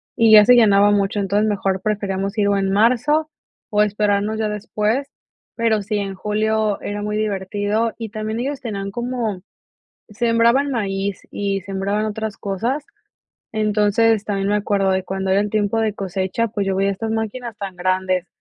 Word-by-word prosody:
y 225 -1 +4
ya 210 -1 +9
se 250 +2 +7
llenaba 205 -3 +5
mucho. 205 0 +1
Entonces 205 +2 +1
mejor 195 -2 -1
preferíamos 200 -1 -2
ir 205 -1 +2
o 200 - +2
en 195 -1 0
marzo 255 +9 +2 0.4
o 210 0 +3
esperarnos 210 +1 0
ya 220 - 0
después, 215 +5 -2 0.5
pero 230 -3 +1
sí, 210 +1 -2
en 195 -1 -3
julio 215 +1 0
era 205 0 -4
muy 210 0 -2
divertido 205 +2 -1
y 225 - -5
también 215 +1 -4
ellos 275 +3 -3
tenían 200 -5 -4
como 235 -4 -3 0.7
sembraban 235 +5 +2
maíz 195 -3 -2
y 200 -1 -2
sembraban 195 +2 -2
otras 215 0 -4
cosas. 235 +9 -2 0.7
Entonces, 215 0 +2
también 200 -1 -1
me 210 - +2
acuerdo 200 -2 +1
de 190 0 0
cuando 190 0 -2
era 195 - +4
el 205 0 0
tiempo 215 +1 0
de 220 -2 0
cosecha, 195 +3 -2
pues 200 -2 -2
yo 190 - 0
veía 195 +1 +1
estas 220 +3 -4
máquinas 225 +1 -4
tan 195 -2 -6
grandes 185 0 0
210 Hz, 170 wpm, -20 LUFS, 195-220 Hz, 0.7 s, ya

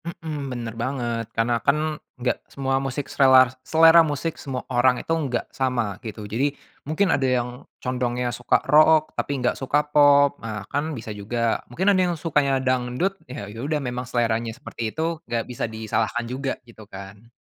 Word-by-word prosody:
Mhm, 155 -4 -5
bener 120 -3 -5
banget 120 -3 -2
karena 115 +2 +2
kan 140 +6 +3 0.4
enggak 125 0 0
semua 135 -1 -1
musik, 135 +1 -3
serela 130 -2 +5
selera 165 +4 +6
musik 155 +1 -1
semua 130 -3 -5
orang 125 +1 +4
itu 165 - -2
enggak 140 -7 -1
sama 120 -7 -1
gitu, 110 -1 -6
jadi 135 +7 -1 0.3
mungkin 185 +4 +2
ada 135 -2 +1
yang 120 0 -2 0.3
condongnya 125 -1 -2
suka 120 +1 +2
rock 155 +2 +5
tapi - - -3
enggak 125 -1 +1
suka 145 +3 +1
pop, 145 -1 +5
nah 105 -3 -5
kan 145 +1 -1
bisa 110 -1 -6
juga 115 +3 -1
mungkin 190 +11 +2
ada 185 - +3
yang 175 - -1
sukanya 145 -4 +1
dangdut 130 +8 0 0.2
ya 125 -5 -6
yaudah 120 +9 -3
memang 125 -3 -4
seleranya 115 -1 0
seperti 120 -5 -5
itu 160 +5 -3
enggak 115 -1 -1
bisa 125 - -5
disalahkan 110 +2 -2
juga 135 0 -3
gitu 115 -2 -15
kan. 100 +3 -11
130 Hz, 170 wpm, -24 LUFS, 120-145 Hz, 0.4 s, selera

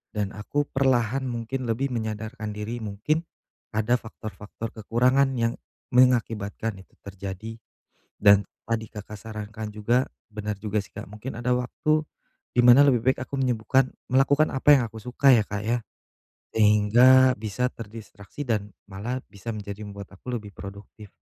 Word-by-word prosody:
dan 105 -2 -1
aku 145 +8 -1
perlahan 130 -2 +1
mungkin 120 +2 -3
lebih 130 +4 0
menyadarkan 110 0 -4
diri 110 +3 -4
mungkin 110 +10 -1 0.5
ada 110 +2 +1
faktor-faktor 110 0 -8
kekurangan 125 +5 +2
yang 115 0 +1 0.4
mengakibatkan 115 -4 +2
itu - - -21
terjadi, 100 +3 -6 0.7
dan 100 -1 +7 0.3
tadi 110 -1 0
Kakak 105 0 -8
sarankan 110 0 -6
juga 120 +5 +1 0.2
benar 105 -1 -4
juga 105 -1 -2
sih, - - -21
Kak, - - -7
mungkin 105 +5 -7
ada 125 +1 +1
waktu 155 +5 0 0.5
di 125 - 0
mana 125 +3 +8
lebih 125 -5 +4
baik - - +1
aku 140 - -4
menyembuhkan 130 +1 +2 0.2
melakukan 145 +3 +4
apa 135 +2 +2
yang - - 0
aku 110 0 -10
suka 130 +3 +4
ya, 115 - +5
Kak, 105 0 -4
ya? 120 +2 +1 0.7
Sehingga 115 +5 +6
bisa 120 +4 -1
terdistraksi 110 +2 -9
dan 105 -5 -2
malah 105 +7 -5
bisa 110 +2 -7
menjadi 100 0 -7
membuat 100 0 -9
aku 100 - -14
lebih 105 -2 -8
produktif 100 +2 -10
110 Hz, 145 wpm, -26 LUFS, 105-125 Hz, 0.7 s, mana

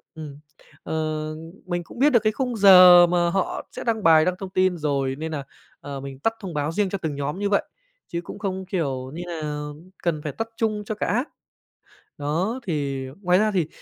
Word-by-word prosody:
ừm, 150 -3 -9 0.4
ờ, - - -5 0.7
mình 175 -1 -2
cũng 235 - -13
biết 285 +3 +5
được 240 -5 +4
cái 215 - +2
khung 250 +1 -2
giờ 180 -3 +9
mà 175 0 +2
họ 190 +2 -2
sẽ - - -7
đăng 220 -3 -1
bài, 160 -1 +6
đăng 185 0 +1
thông 195 - -6
tin 185 -1 +1
rồi, 140 -4 -1
nên 160 +3 -5
nà, 145 -3 -4 0.4
ờ, 140 -1 -7
mình 135 0 -8
tắt 225 +8 +1
thông 190 -5 -7
báo 150 +1 -1
riêng 200 +2 0
cho 195 - -2
từng 160 -5 -4
nhóm 145 +5 -3
như 205 0 0
vậy. 200 - +2 0.4
Chứ 170 - -4
cũng 175 - -9
không, 190 -3 -3
kiểu 135 -9 -3
như 175 - -5
nà, 165 -3 -5 0.6
cần 165 -3 0
phải 150 - -3
tắt 225 +7 -4
chung 215 -2 -1
cho 215 - -3
cả - - -2
app. 245 +7 0 0.9
Đó, 170 - -1
thì 140 -4 -2 0.2
ngoài 180 -1 +3
ra 215 0 +2
thì, 175 -6 0
175 Hz, 215 wpm, -24 LUFS, 150-200 Hz, 0.9 s, giờ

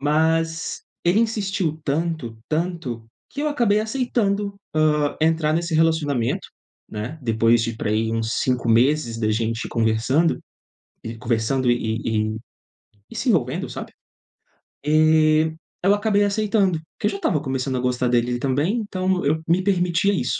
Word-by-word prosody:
Mas 160 +3 0 0.2
ele 180 +6 +4
insistiu 195 -8 -1
tanto, 155 -5 -2
tanto, 155 -9 -3 0.2
que 285 - -6
eu 300 - +1
acabei 235 -8 +2
aceitando, 215 -4 -1 0.2
hã, 150 -2 +2
entrar 160 -1 +2
nesse 170 0 -1
relacionamento, 155 -7 +1 0.4
né? 110 +9 -5
Depois 115 0 +3
de 115 0 -2
pra 105 - -2
aí 110 +1 +1
uns 115 0 -1
5 125 -2 0
meses 120 +1 +3
da 110 -1 0
gente 115 +1 -1
conversando 115 +8 +1 0.7
e 115 0 -6
conversando 120 +2 0
e 120 - +3
e 110 -1 -1
e - - -4 0.7
e - - -10
se - - -3
envolvendo, - - +1
sabe? - - -7 0.9
E 155 0 +4 0.3
eu 195 - +5
acabei 205 0 +2
aceitando. 205 -3 +1 0.2
Que - - -3
eu 210 - 0
já 200 - -4
estava 170 -6 0
começando 130 -2 -2
a - - -1
gostar 125 0 0
dele 120 0 +1
também, 145 - 0
então 185 -3 -1
eu 155 +3 +2
me 180 +3 +2
permitia 180 0 +2
isso. - - -1
155 Hz, 150 wpm, -22 LUFS, 120-185 Hz, 0.9 s, eu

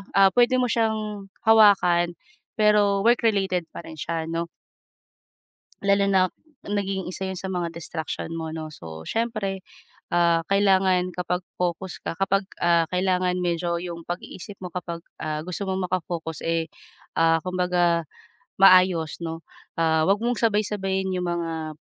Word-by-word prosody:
ah, 195 0 +7
puwede 245 +1 +4
mo 250 - +2
siyang 215 -3 -1 0.2
hawakan 190 -6 +5 0.4
pero 210 -2 +4
work-related 200 -7 +2
pa - - -8
rin 160 - -9
siya 165 +1 -2
'no. 165 +1 -2 1.3
Lalo 200 0 +3
nak 185 -2 +3 0.3
naging 195 -2 -2
isa 185 +1 -6
yun 190 -1 -3
sa 190 - -5
mga 180 -3 -2
distraction 165 0 -5
mo 160 -1 -4
'no, 160 0 -5
so 80 - -10
siyempre, 215 -5 -2 0.5
ah, 170 -1 +3
kailangan 190 -2 +3
kapag 180 0 -2 0.2
focus 180 +1 -2
ka - - -5
kapag, 195 +2 0 0.2
ah, 170 -1 +4
kailangan 180 0 +1
medyo 170 0 -1
yung 170 -2 -7
pag-iisip 175 +2 -6
mo 180 - -5
kapag, 170 -1 -5 0.2
ah, 155 -1 -3
gusto 180 +4 -5
mong 190 -1 -2
maka-focus 165 -3 -3
,eh, 165 -1 0 0.5
ah, 165 0 +4
kumbaga, 180 -2 +1 0.5
maayos 185 -5 +5
'no, 165 0 -5 0.3
ah, 160 0 +2
'wag 195 - +5
mong 240 -1 0
sabay-sabayin 200 -3 0
yung 180 - -2
mga, 165 -3 -3
180 Hz, 140 wpm, -24 LUFS, 165-195 Hz, 1.3 s, ah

